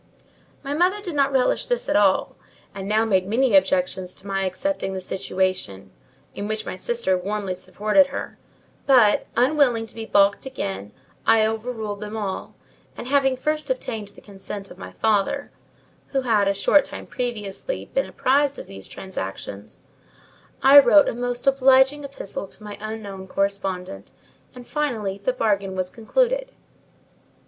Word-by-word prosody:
My 280 0 -3
mother 360 +6 +2
did 375 -5 -6
not 280 -1 +2
relish 265 -2 +1
this - - -1
at - - 0
all, 200 -2 +3 0.4
and 195 -1 -6
now 215 +2 +2
made 190 -4 +1
many 250 +5 +2
objections 270 -11 +1
to - - -12
my 195 -1 -1
accepting 195 +2 -2
the 190 - -3
situation; 185 - -2 0.4
in 205 - -5
which 215 0 -3
my - - -5
sister 190 0 0
warmly 195 +1 -3
supported 210 +8 +2
her: 280 - -6 0.5
but, 245 -7 +5
unwilling 250 -2 +3
to 225 - -11
be 225 -1 -7
balked 200 0 +3
again, 100 - -5 0.4
I 220 -1 +5
overruled 220 -2 -3
them 210 +1 -5
all; 200 -3 -4 0.4
and, 245 - -7
having 270 -2 +3
first 305 +1 -2
obtained 225 -5 -3
the 205 - -16
consent 200 0 -8
of - - -13
my - - -8
father 220 +6 0 0.6
(who 270 - -1
had, 220 -5 +2
a 200 - +3
short 280 +8 +4
time - - -8
previously, 240 - -4
been - - +1
apprised 280 +2 +1
of - - -7
these 95 0 -10
transactions), 100 - -7 0.8
I 275 +2 +10
wrote 295 +1 +6
a - - -3
most 245 +1 -3
obliging 270 +1 +4
epistle 275 -8 -5
to 210 - -10
my 205 -1 -7
unknown 205 -3 -6
correspondent, 190 - -3 0.5
and, 245 -1 -11
finally, 225 -10 -2
the 200 +6 0
bargain 200 -6 0
was 185 -1 -2
concluded. - - 0
220 Hz, 155 wpm, -23 LUFS, 195-270 Hz, 0.8 s, I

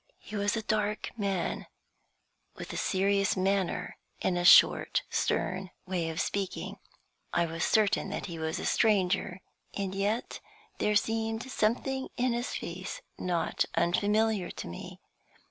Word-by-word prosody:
He 215 - -10
was 205 +2 +1
a 220 - -2
dark 210 0 -1
man, 195 -5 -2 0.9
with - - -7
a - - -5
serious 195 +1 +1
manner, 190 -1 0 0.2
and 185 - 0
a 175 - 0
short, 175 - +6
stern 185 0 0 0.2
way 180 -3 -1
of 160 - -4
speaking. 195 -2 -2 0.5
I 170 - +3
was 165 0 -3
certain 210 -2 +2
that 200 - -4
he 170 -3 -6
was 160 0 -2
a - - -4
stranger, 190 -3 +2 0.3
and 195 -1 -2
yet 205 +4 -1 0.4
there 210 - +2
seemed 225 +3 0
something 265 +5 0
in 250 -1 +2
his 240 +1 -2
face 180 +2 -5 0.2
not 175 -2 0
unfamiliar 205 +2 +2
to - - -7
me. 85 - -8
200 Hz, 140 wpm, -30 LUFS, 180-215 Hz, 0.9 s, short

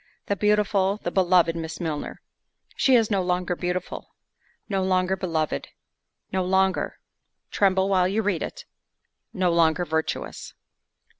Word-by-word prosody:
The 200 - 0
beautiful, 205 -1 +2
the 175 - -2
beloved 175 -3 +3
Miss 160 -1 -5
Milner—she 165 - -3
is 225 -2 +3
no 195 -2 +2
longer 180 0 -1
beautiful—no 185 +2 -6
longer 185 0 +1
beloved—no 170 - -4
longer—tremble 190 +1 -1
while 185 -2 +3
you 210 +4 0
read 195 -5 0
it!—no 190 - -6
longer—virtuous. 160 -1 0
185 Hz, 95 wpm, -25 LUFS, 175-195 Hz, -, beloved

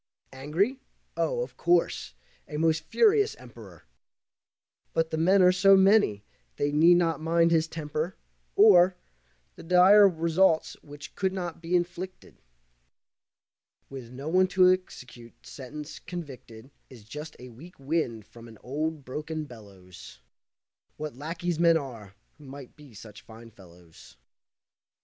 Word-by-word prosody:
Angry? 165 - -2 0.4
Oh, - - -1
of - - -11
course, 170 - 0 0.3
a 150 - -6
most 160 0 0
furious 425 - +2
Emperor! - - -15 1.1
But 165 0 -1
the 160 - -2
men 185 +4 +3
are 180 - +6
so 195 +2 +5
many 190 - +3 0.3
they 145 - -1
need 165 +4 +5
not 165 -3 0
mind 165 +1 +2
his 160 -1 +2
temper, 155 +2 -5 0.4
or 185 -3 +6 0.6
The - - -11
dire 185 +4 +6
results 165 0 +1
which 145 -1 -12
could 190 0 -2
not 175 -3 -6
be 170 +2 -2
inflicted. 180 +1 -5 1.5
With 130 -4 -9
no 135 +4 -9
one 185 +3 +3
to 185 0 +4
execute 125 -10 -10
sentence, 150 +3 -9
convicted 130 -8 -10 0.2
Is 120 -5 -14
just 150 +8 -10
the 125 - -12
weak 150 +10 -15
wind 135 -7 -3
from 115 +1 -15
an 110 -1 -14
old, 150 +3 -4
broken 155 +4 -5
bellows. 95 - -14 0.8
What 150 -3 -6
lackeys 165 +4 -4
men 170 -1 +4
are, 115 -9 -9 0.2
who 150 - -15
might 135 -1 -12
be 145 -6 -17
such 105 0 -13
fine 115 +1 -15
fellows! 90 - -18
160 Hz, 135 wpm, -26 LUFS, 130-180 Hz, 1.5 s, are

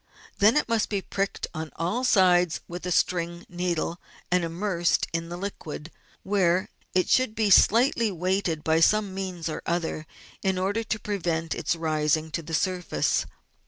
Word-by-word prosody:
Then 215 +7 +5
it - - +1
must 230 -2 +1
be 200 -2 -2
pricked 195 0 -2
on 160 -1 -5
all 180 +10 -1
sides 180 -7 +4
with 175 +1 -6
a - - -2
string 170 0 0
needle, 175 -1 -2 0.3
and 180 -1 +3
immersed 170 +1 0
in 165 0 -2
the 175 - -5
liquid, 170 -5 -6 0.3
where 190 -2 +1 0.3
it 185 - +3
should 255 -4 +2
be 215 -2 +1
slightly 230 +2 +5
weighted 180 -3 -1
by 160 0 +3
some 205 +3 +3
means 185 -3 -4
or 155 - -4
other 165 -2 -2 0.3
in 190 -1 0
order 200 +5 0
to 215 0 -2
prevent 170 -6 -2
its 165 +1 -1
rising 155 -1 0
to 165 - -2
the 160 0 -4
surface. 180 - 0
180 Hz, 160 wpm, -26 LUFS, 165-200 Hz, 0.3 s, Then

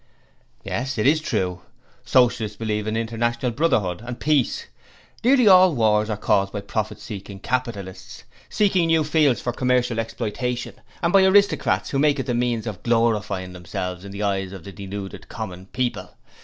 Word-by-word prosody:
'Yes; 135 +1 -3
it 105 - 0
is 155 +3 +4
true. 90 - -2 0.4
Socialists 120 -4 +2
believe 105 -1 -2
in 110 +1 -1
International 120 +2 -1
Brotherhood 110 - 0
and 120 0 -6
peace. 150 -4 +1 0.6
Nearly 250 -1 +5
all 185 -4 +7
wars 110 -2 +2
are 105 - -2
caused 100 -1 +1
by 105 - -4
profit 105 +1 -3
seeking 100 -2 -8
capitalists, 105 -5 -4 0.3
seeking 190 -5 +2
new 165 -1 +3
fields 150 -4 +2
for 120 - -3
commercial 125 -2 +1
exploitation, 120 +2 -3 0.3
and 170 - +1
by 195 -1 +7
aristocrats 195 -3 +3
who 135 - 0
make 145 -1 +3
it 130 - -2
the 125 - -1
means 120 -2 0
of 105 -5 -6
glorifying 105 -6 0
themselves 90 0 -5
in 100 - -9
the 100 +1 -4
eyes 95 -1 -1
of 95 -4 -9
the 100 - -9
deluded 100 0 -7
common 95 -4 -7
people. 125 +2 -3
115 Hz, 165 wpm, -23 LUFS, 100-130 Hz, 0.6 s, all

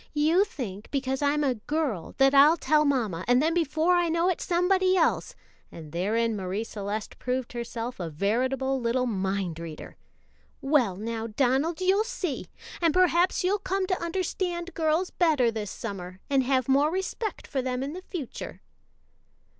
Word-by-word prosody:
"You 320 +7 +4
think 220 - -7
because 265 -1 -2
I'm 290 +1 +2
a 270 -3 +2
girl 245 - -3
that 270 0 +5
I'll 290 +4 +7
tell 305 +1 +3
mamma, 225 - 0
and 245 +1 +5
then 320 +4 +2
before 325 +1 +2
I 350 -1 +2
know 335 +2 +2
it 365 - -1
somebody 370 +2 +2
else," 330 - +1 0.4
and 155 -3 -10
therein 220 +7 0
Marie 195 +2 -3
Celeste 210 -1 -5
proved 250 0 -2
herself 235 0 -5
a 170 -2 -3
veritable 255 - 0
little 240 +2 +1
mind 190 -6 -2
reader. 165 -2 -8 0.6
"Well, 270 -9 +2
now, 225 +2 -4
Donald, 270 - +1
you'll 385 +3 +3
see! 370 - -4 0.3
and 330 -1 +2
perhaps 365 0 +3
you'll 395 +3 +1
come 385 0 -1
to 370 -1 -1
understand 350 0 -2
girls 320 +3 0
better 300 -9 +3
this 215 -3 -4
summer, 185 -5 -7
and 275 -1 +4
have 260 -1 +1
more 280 +3 +4
respect 380 +4 -3
for 270 - -2
them 255 0 -2
in 280 +2 -4
the 365 - -7
future." 335 - -7
270 Hz, 160 wpm, -27 LUFS, 225-340 Hz, 0.6 s, I'll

